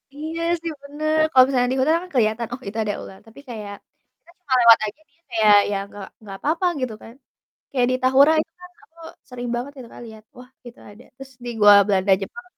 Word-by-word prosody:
Iya 320 +3 -6 0.2
sih 335 -1 -4
bener, 310 +2 -2
kalau 255 -1 +7
misalnya 250 -2 0
di 265 - -2
kota 285 +5 +2
kan 365 - -12
keliatan, 225 -1 0
"Oh 260 - -7
itu 205 - -7
ada 205 -1 -2
ular," 190 - -12
tapi 225 +5 -16
kayak 210 -3 -7 0.4
kita - - -28
cuma 265 - -3
lewat 230 -1 +7
aja 215 +9 -8
dia 335 - -38
kayak 215 -2 +4 0.2
ya 200 - -1 0.2
gak 200 -2 -9 0.2
gak 195 -1 -8
apa-apa 330 +5 0 0.2
gitu 245 -4 -3
kan. 225 - -12 0.6
Kayak 245 -2 +2
di 255 - +1
Tahura 270 +4 +5
itu 325 - -7
kan 360 0 -13 0.2
aku 330 +1 -31 0.3
sering 245 -1 -7
banget 250 +4 -5
gitu 235 - -13
Kak - - -12
liat, 220 -1 -13 0.2
"Wah 250 - -12 0.2
itu 240 - -12
ada." 210 +4 -16
Terus 270 0 -11
di - - -6
Goa 205 -1 +7
Belanda, 195 -1 +1
Jepang 360 - -8
245 Hz, 220 wpm, -21 LUFS, 215-290 Hz, 0.6 s, kalau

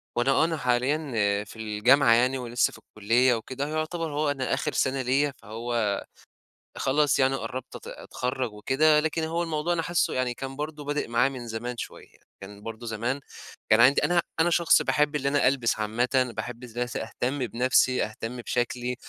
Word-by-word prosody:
وأنا 120 +3 +2
آه، 155 - +3
أنا 165 -1 -2
حاليّا 125 -5 0
في 105 - -13
الجامعة، 115 +4 +4
يعني 125 +3 +3
ولسّه 120 -1 0
في - - -11
الكلّية 115 +4 +2
وكده، 130 +5 -4
يُعتبر 155 +1 -3
هو 150 0 +1
أنا 135 -2 -2
آخر - - -1
سنة 130 0 +1
ليّا، 135 +3 +1
فهو 110 -1 -2 0.7
خلاص 140 +1 +2
يعني 135 0 +3
قرّبت 130 -1 -6
أت - - -10
أتخرّج 125 -3 -4
وكده. 150 +8 +3
لكن 160 +1 -1
هو 165 +2 -1
الموضوع 165 +1 -1
أنا 165 - 0
حاسه 175 +1 0
يعني 125 -1 0
كان 135 +2 -7
برضو 150 0 -5
بادئ 145 -2 -2
معايا 120 +3 +2
من 125 -3 -8
زمان 120 +2 -5
شُويّة، - - -9 0.2
كان 100 +1 -10
برضو 115 +1 -7
زمان 115 +5 -2 0.5
كان 110 +1 +6
عندي 130 +4 +5
أنا 175 -1 +3 0.2
أنا 170 +2 +4
شخص 170 0 +4
باحب 150 0 +1
اللي 140 -1 -1
أنا 145 -2 +3
ألبس 125 -5 +1
عامةً، 125 +4 +1
وباحب 120 +1 -6
ازا 120 0 -3
س 120 - -6
أهتمّ 125 +5 -3
بنفسي، 130 +2 +2
أهتمّ 115 +3 -6
بشكلي، 120 +1 -2
130 Hz, 180 wpm, -26 LUFS, 115-145 Hz, 0.7 s, كان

